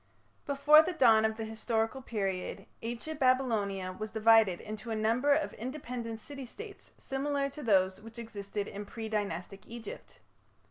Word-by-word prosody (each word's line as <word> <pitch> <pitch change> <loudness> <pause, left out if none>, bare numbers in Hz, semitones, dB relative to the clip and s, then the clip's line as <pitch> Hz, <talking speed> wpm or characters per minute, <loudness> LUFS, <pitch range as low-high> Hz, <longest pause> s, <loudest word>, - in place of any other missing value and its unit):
Before 290 +2 +7
the 360 +3 -2
dawn 225 -8 +5
of 220 0 0
the 225 - -3
historical 225 +3 -1
period 195 -4 -3 0.2
Ancient 240 +7 -5
Babylonia 220 -8 +1
was 215 +4 -6
divided 220 -4 +5
into 215 +1 -7
a 225 - -1
number 230 +6 +2
of 305 +2 +2
independent 240 -2 -5
city 275 +2 -8
states 410 - -10
similar 275 +1 -1
to 300 - -9
those 190 -6 +2
which 225 +2 -12
existed 205 -3 -5
in 205 0 -7
pre 225 0 -6
Dynastic 200 -2 -3
Egypt. 230 -2 -9
225 Hz, 150 wpm, -31 LUFS, 210-265 Hz, 0.2 s, Before